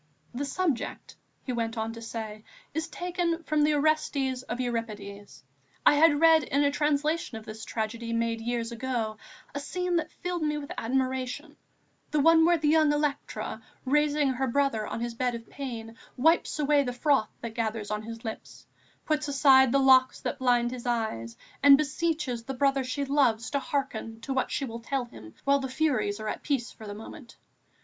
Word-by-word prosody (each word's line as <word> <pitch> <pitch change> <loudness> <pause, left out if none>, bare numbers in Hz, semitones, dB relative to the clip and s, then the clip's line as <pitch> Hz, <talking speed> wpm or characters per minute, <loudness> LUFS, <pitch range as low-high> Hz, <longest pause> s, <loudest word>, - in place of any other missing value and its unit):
"The 270 +4 -3
subject," 315 -4 -2 0.3
he 255 - -4
went 230 -1 -2
on 220 +1 -2
to 230 - -9
say, 220 -2 -6 0.3
"is 320 +1 -2
taken 345 0 -2
from 305 0 +1
the 300 0 +3
Orestes 285 -3 +1
of 245 -1 -5
Euripides. 210 - -5 0.4
I - - +8
had 295 0 +5
read, 325 0 +6
in 280 +1 +1
a 285 - +3
translation 295 -2 0
of 220 - -10
this 220 0 -8
tragedy 230 +1 -3
made 230 0 0
years 235 0 -2
ago, 235 -3 -2 0.4
a 285 - -3
scene 360 +4 -1
that 325 - -1
filled 355 -1 -4
me 300 -1 0
with 285 -1 -7
admiration, 260 +4 -2 0.5
the 300 - +1
one 325 +2 +6
where 345 0 +4
the 305 -1 0
young 310 -1 +5
Electra, 295 -1 -2 0.2
raising 295 +1 +2
her 265 +1 -1
brother 235 -4 +1
on 230 - -4
his 235 0 -3
bed 245 +1 -1
of 230 0 -9
pain, 230 -5 -6 0.2
wipes 320 +6 +3
away 295 -1 +3
the 250 -3 -2
froth 270 -2 +2
that 230 -1 -5
gathers 220 -2 -2
on 210 0 -1
his 230 +1 -9
lips, 220 - -7 0.4
puts 305 -1 0
aside 265 -2 +6
the 275 - +4
locks 260 -1 +5
that - - -3
blind 245 -2 +2
his 250 -1 -6
eyes 220 - -2 0.2
and 280 0 +9
beseeches 300 -4 -1
the 270 - -4
brother 275 0 +2
she 270 +3 -2
loves 255 -5 +2
to 280 - +1
hearken 225 -6 -3
to 270 - -3
what 265 - 0
she 275 - -1
will 230 -2 -6
tell 260 +2 -2
him 110 - -13
while 280 0 +3
the 265 -1 -4
Furies 250 -8 0
are 215 - -5
at - - -3
peace 260 -5 -1
for 220 - -11
the 205 - -6
moment.... 235 +4 -11
260 Hz, 190 wpm, -28 LUFS, 230-295 Hz, 0.5 s, and